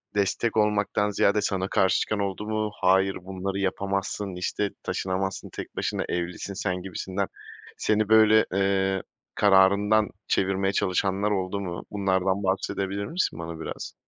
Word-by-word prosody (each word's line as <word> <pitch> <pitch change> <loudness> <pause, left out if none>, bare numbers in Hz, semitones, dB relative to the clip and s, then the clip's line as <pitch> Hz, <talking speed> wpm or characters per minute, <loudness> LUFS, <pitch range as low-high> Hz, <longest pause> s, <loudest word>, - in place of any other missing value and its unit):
destek 105 +3 0
olmaktan 105 -1 +2
ziyade 100 +1 +2
sana 95 -2 -1
karşı 95 -2 +3
çıkan 105 -1 -1
oldu 100 +1 -3
mu? 110 -1 -1
"Hayır, 95 +1 +3
bunları 95 +1 -4
yapamazsın, 100 0 -2
işte, 100 +2 -1
taşınamazsın 95 +1 -2
tek - - -8
başına, - - -1
evlisin 90 +3 -3
sen" 90 -2 -2
gibisinden. 95 +1 -3 0.5
Seni 110 0 +1
böyle, 110 0 +6
eee, 95 -1 +1 0.3
kararından 100 +2 +4 0.2
çevirmeye 95 0 +1
çalışanlar 95 +3 +1
oldu 95 0 -1
mu? 90 -2 -5
Bunlardan 95 -1 +1
bahsedebilir 95 +1 -1
misin 165 - -1
bana 85 -1 -6
biraz? - - -6
95 Hz, 130 wpm, -26 LUFS, 95-105 Hz, 0.5 s, böyle